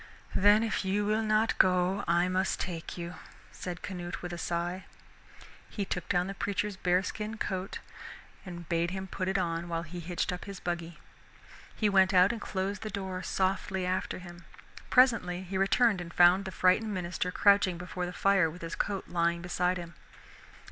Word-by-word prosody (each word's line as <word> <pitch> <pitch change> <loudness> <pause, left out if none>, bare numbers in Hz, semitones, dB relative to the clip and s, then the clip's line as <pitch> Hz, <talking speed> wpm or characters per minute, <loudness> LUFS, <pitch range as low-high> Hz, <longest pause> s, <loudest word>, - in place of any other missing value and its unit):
"Then 205 +3 +5
if 220 -2 -1
you 200 +2 0
will 215 +1 +1
not 215 +1 +2
go 185 +1 +3
I 170 +1 +3
must 185 +1 0
take 170 -2 -5
you," 170 0 -5 0.4
said 180 -1 -7
Canute 175 -3 -5
with 175 0 -5
a - - -4
sigh. 175 +3 -2 0.8
He 200 - -3
took 180 -2 -4
down 180 0 +2
the 195 - -4
preacher's 205 +1 -2
bearskin 195 +4 -1
coat 190 -2 -3 0.7
and 175 -3 -8
bade 170 +1 +1
him 190 +1 -4
put 185 0 -4
it 190 +1 +1
on 170 -1 -2
while 165 0 -2
he 170 +2 -7
hitched 175 +1 -2
up 180 - -6
his 200 -2 -7
buggy. 170 -1 -4 0.8
He 215 - +1
went 190 -1 +4
out 180 +2 +6
and 230 -3 -5
closed 195 +1 -3
the 215 - -4
door 190 -3 -4
softly 190 0 -1
after 185 +1 -1
him. 175 -1 -11 0.4
Presently 225 -8 +4
he 190 +1 -6
returned 195 +1 +3
and 170 -1 -8
found 180 +3 +5
the 190 - -4
frightened 185 +4 +2
minister 180 0 -2
crouching 200 -2 +4
before 180 0 -4
the - - -5
fire 195 -3 +3
with 170 +2 -10
his 165 - -5
coat 200 -2 -2
lying 170 0 0
beside 180 0 0
him. 170 -1 -8
185 Hz, 180 wpm, -30 LUFS, 175-195 Hz, 0.8 s, out